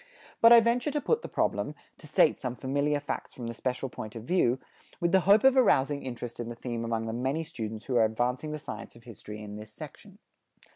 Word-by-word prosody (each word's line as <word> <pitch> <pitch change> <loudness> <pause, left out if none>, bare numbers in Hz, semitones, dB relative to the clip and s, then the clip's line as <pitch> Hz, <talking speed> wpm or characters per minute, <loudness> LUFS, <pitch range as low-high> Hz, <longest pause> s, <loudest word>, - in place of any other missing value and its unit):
But 230 - +8
I 235 - +11
venture 235 +5 +1
to 295 - -1
put 460 +10 +1
the - - -6
problem, - - -1 0.2
to - - -12
state - - +4
some 125 -1 -4
familiar 140 +3 0
facts 145 - -5
from 120 - -7
the 115 - -4
special 130 +3 -3
point 110 -3 -8
of 115 - -7
view, 125 -4 +2 0.4
with 170 0 +1
the 190 - +6
hope 205 +2 +7
of 265 0 +6
arousing 145 - +3
interest 120 -2 -6
in 120 -1 -4
the 120 - -6
theme 120 -1 -4
among 115 -1 -2
the 110 - -3
many 135 +7 -1
students 110 -7 -6
who 130 -2 0
are 115 - +5
advancing 125 +7 -1
the 150 - -3
science 105 -9 -8
of 120 - -16
history 105 -2 -9
in 105 0 -8
this 105 0 -10
section. 155 - -11
125 Hz, 230 wpm, -29 LUFS, 115-160 Hz, 0.4 s, I